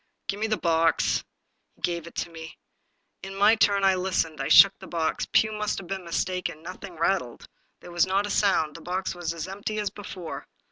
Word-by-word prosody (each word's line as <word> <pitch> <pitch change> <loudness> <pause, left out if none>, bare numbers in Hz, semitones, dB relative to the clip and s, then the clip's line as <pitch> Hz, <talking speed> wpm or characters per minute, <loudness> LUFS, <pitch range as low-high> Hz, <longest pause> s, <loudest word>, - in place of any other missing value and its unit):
*' - - -52
Give 200 - -2
me 220 - 0
the 215 -1 0
box." 165 -1 +2 0.5
He - - -28
gave 170 -1 -2
it - - -4
me. 160 -1 -10 0.6
In 195 +1 -8
my 205 +3 +5
turn, 200 -2 +3
I 195 0 +5
listened. 180 -4 -1
I - - -2
shook 195 0 +8
the 190 - -10
box. 165 -2 -1
Pugh 220 - +4
must 210 -1 -2
have 195 - -6
been 190 0 -5
mis 170 - 0
taken. 180 -4 -4
Nothing 185 +1 -9
rattled; 165 -6 -1 0.3
there 175 - -11
was 175 +2 +2
not 195 +2 +1
a 205 - -4
sound; 160 -7 +2
the 165 - -9
box 185 +3 -3
was 175 -2 -4
as 170 +1 -5
empty 205 +3 -5
as 210 -1 -1
before. 185 -4 -8
185 Hz, 215 wpm, -26 LUFS, 170-195 Hz, 0.6 s, shook